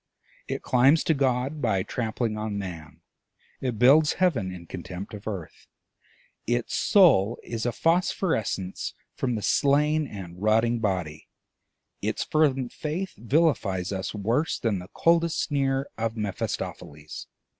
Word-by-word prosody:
It -, -, -4 dB
climbs 135 Hz, +6 st, +4 dB
to 160 Hz, -, +2 dB
God 135 Hz, +1 st, 0 dB
by 100 Hz, -7 st, +1 dB
trampling 115 Hz, 0 st, -2 dB
on 105 Hz, -1 st, -3 dB
Man, 85 Hz, -6 st, -7 dB, 0.6 s
it 125 Hz, -4 st, -2 dB
builds 145 Hz, +6 st, +6 dB
Heaven 135 Hz, -, +1 dB
in 90 Hz, -2 st, -9 dB
contempt 90 Hz, +4 st, -7 dB
of 105 Hz, 0 st, -8 dB
Earth, 95 Hz, -7 st, -6 dB, 0.8 s
its 120 Hz, 0 st, -1 dB
soul 135 Hz, -, +5 dB
is 115 Hz, 0 st, -3 dB
a -, -, +1 dB
phosphorescence 165 Hz, -, 0 dB, 0.2 s
from 125 Hz, -3 st, -1 dB
the 105 Hz, -, -4 dB
slain 150 Hz, +2 st, +2 dB
and 90 Hz, -4 st, -9 dB
rotting 115 Hz, +2 st, +3 dB
Body; 90 Hz, -8 st, -2 dB, 0.7 s
its -, -, -1 dB
fervent 135 Hz, -5 st, +1 dB
faith 170 Hz, +5 st, -4 dB
vilifies 115 Hz, -, +1 dB
us 95 Hz, +2 st, -3 dB
worse 115 Hz, +10 st, 0 dB
than 110 Hz, -5 st, -1 dB
the 90 Hz, -, -9 dB
coldest 170 Hz, -1 st, +2 dB
sneer 135 Hz, -2 st, 0 dB
of 115 Hz, 0 st, -2 dB
Mephistopheles. 75 Hz, -7 st, -5 dB
115 Hz, 130 wpm, -26 LUFS, 100-145 Hz, 0.8 s, builds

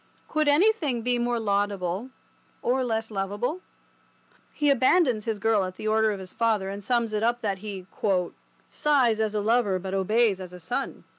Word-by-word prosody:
Could 310 Hz, -1 st, 0 dB
anything 295 Hz, -, +2 dB
be 245 Hz, 0 st, +1 dB
more 240 Hz, 0 st, 0 dB
laudable—or 205 Hz, +5 st, -2 dB
less 225 Hz, -2 st, -2 dB
lovable? 205 Hz, -, -2 dB, 0.9 s
He 295 Hz, -2 st, +2 dB
abandons 260 Hz, -, +3 dB
his 225 Hz, -2 st, -1 dB
girl 215 Hz, -1 st, +2 dB
at 185 Hz, 0 st, -5 dB
the 215 Hz, -, -5 dB
order 220 Hz, 0 st, +3 dB
of 205 Hz, -, -2 dB
his 185 Hz, -1 st, -10 dB
father, 220 Hz, -4 st, 0 dB
and 200 Hz, +1 st, -6 dB
sums 235 Hz, -1 st, 0 dB
it 210 Hz, -, 0 dB
up 240 Hz, +2 st, +1 dB
that 200 Hz, -3 st, -2 dB
he 195 Hz, -3 st, -7 dB, 0.9 s
"sighs 260 Hz, -7 st, +2 dB
as 215 Hz, -1 st, 0 dB
a 210 Hz, -, +1 dB
lover 215 Hz, -3 st, +2 dB
but 190 Hz, +1 st, -6 dB
obeys 200 Hz, +1 st, +2 dB
as 180 Hz, -1 st, -9 dB
a 180 Hz, -, -9 dB
son." 165 Hz, -, -4 dB
220 Hz, 170 wpm, -26 LUFS, 200-245 Hz, 0.9 s, abandons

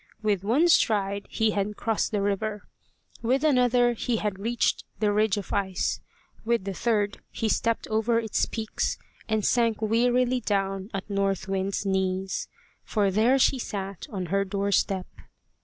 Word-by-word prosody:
With 205 Hz, -3 st, +1 dB
one 260 Hz, +12 st, +3 dB
stride 200 Hz, -, +2 dB
he 220 Hz, -1 st, +1 dB
had 205 Hz, +1 st, -2 dB
crossed 225 Hz, 0 st, 0 dB
the 205 Hz, -2 st, 0 dB
river; 205 Hz, +1 st, -1 dB, 0.6 s
with 255 Hz, +5 st, +1 dB
another 250 Hz, -4 st, +4 dB
he 235 Hz, +1 st, -1 dB
had 210 Hz, -3 st, -2 dB
reached 230 Hz, +3 st, 0 dB, 0.2 s
the 210 Hz, -1 st, +2 dB
ridge 210 Hz, -1 st, +2 dB
of 200 Hz, -, -5 dB
ice; 190 Hz, -2 st, 0 dB, 0.4 s
with 230 Hz, -2 st, +1 dB
the 195 Hz, 0 st, -4 dB
third 205 Hz, 0 st, 0 dB
he 225 Hz, -, -2 dB
stepped 230 Hz, +1 st, 0 dB
over 220 Hz, +2 st, +1 dB
its 225 Hz, -2 st, 0 dB
peaks, 220 Hz, -1 st, -2 dB, 0.3 s
and 220 Hz, -2 st, +1 dB
sank 230 Hz, -3 st, +2 dB
wearily 245 Hz, +3 st, +2 dB
down 195 Hz, -3 st, -1 dB
at 195 Hz, -2 st, -5 dB
North 195 Hz, -2 st, -1 dB
Wind's 195 Hz, +1 st, -1 dB
knees. 190 Hz, 0 st, -1 dB, 0.4 s
For 205 Hz, -3 st, +1 dB
there 225 Hz, +7 st, +4 dB
she 265 Hz, 0 st, +3 dB
sat 195 Hz, -5 st, -5 dB
on 190 Hz, -6 st, -4 dB
her 195 Hz, 0 st, +3 dB
doorstep. 195 Hz, -1 st, 0 dB
210 Hz, 155 wpm, -26 LUFS, 195-230 Hz, 0.6 s, another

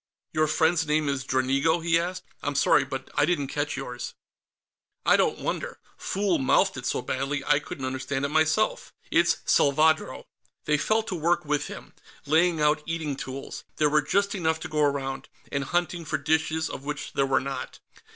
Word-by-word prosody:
"Your 155 Hz, 0 st, +2 dB
friend's 160 Hz, +1 st, +2 dB
name 150 Hz, 0 st, +1 dB
is 140 Hz, -1 st, -1 dB
Dranigo?" 135 Hz, +5 st, +1 dB
he 165 Hz, 0 st, +3 dB
asked. 180 Hz, +2 st, -4 dB, 0.2 s
"I'm 145 Hz, 0 st, -2 dB
sorry, 140 Hz, -, +4 dB
but 135 Hz, -1 st, -6 dB
I -, -, +2 dB
didn't 145 Hz, -6 st, 0 dB
catch 145 Hz, -1 st, -2 dB
yours." 125 Hz, -2 st, -6 dB, 0.9 s
"I -, -, +6 dB
don't -, -, +2 dB
wonder; -, -, -3 dB, 0.2 s
fool 195 Hz, -4 st, 0 dB
mouthed 130 Hz, -, +3 dB
it -, -, -4 dB
so -, -, -1 dB
badly 135 Hz, +2 st, -2 dB
I 150 Hz, 0 st, +4 dB
couldn't 135 Hz, -2 st, -6 dB
understand 130 Hz, +1 st, -2 dB
it -, -, -1 dB
myself. 160 Hz, +7 st, +1 dB, 0.2 s
It's 170 Hz, 0 st, +3 dB
Salvadro." 155 Hz, +3 st, +3 dB, 0.4 s
They 150 Hz, -1 st, +2 dB
fell 220 Hz, +7 st, +2 dB
to 205 Hz, -, -5 dB
work 170 Hz, 0 st, +1 dB
with 150 Hz, -1 st, 0 dB
him, -, -, -10 dB, 0.3 s
laying 165 Hz, +2 st, +3 dB
out 150 Hz, +1 st, +3 dB
eating 160 Hz, -3 st, -2 dB
tools 135 Hz, 0 st, -7 dB
there 150 Hz, -1 st, +2 dB
were 150 Hz, 0 st, +4 dB
just 200 Hz, +7 st, +1 dB
enough 160 Hz, -5 st, 0 dB
to -, -, -4 dB
go 155 Hz, -1 st, -1 dB
around 140 Hz, -2 st, -1 dB, 0.2 s
and 140 Hz, 0 st, -1 dB
hunting 175 Hz, +2 st, -1 dB
for -, -, -2 dB
dishes, 160 Hz, +1 st, 0 dB
of 135 Hz, -, -7 dB
which 145 Hz, 0 st, -5 dB
there 135 Hz, -, +1 dB
were 135 Hz, -, +3 dB
not. 135 Hz, +1 st, -6 dB
150 Hz, 180 wpm, -26 LUFS, 140-165 Hz, 0.9 s, I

